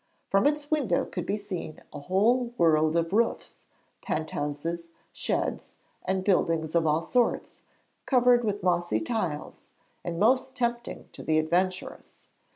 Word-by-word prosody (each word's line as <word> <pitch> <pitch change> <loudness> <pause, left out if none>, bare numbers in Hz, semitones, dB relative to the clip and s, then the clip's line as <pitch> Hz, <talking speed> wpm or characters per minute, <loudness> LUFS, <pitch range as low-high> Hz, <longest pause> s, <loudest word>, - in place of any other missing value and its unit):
From 195 +8 +4
its 295 0 -1
window 265 - +1
could - - -5
be 205 - 0
seen 190 -6 -6
a - - -6
whole 230 - +2
world 155 -2 +3
of 165 +2 0
roofs, 230 +2 0 0.4
penthouses, 155 +2 -3 0.3
sheds, - - -2 0.3
and 190 0 -1
buildings 165 -5 +1
of 165 -2 +3
all 155 +2 +2
sorts, 245 -2 0 0.5
covered 245 -2 +5
with 205 -3 -2
mossy 175 -1 +1
tiles, 200 - -4 0.3
and 170 -1 -4
most 255 +5 +3
tempting 240 -1 -2
to - - -10
the 155 - +1
adventurous. 180 +4 -1
185 Hz, 135 wpm, -27 LUFS, 165-235 Hz, 0.5 s, covered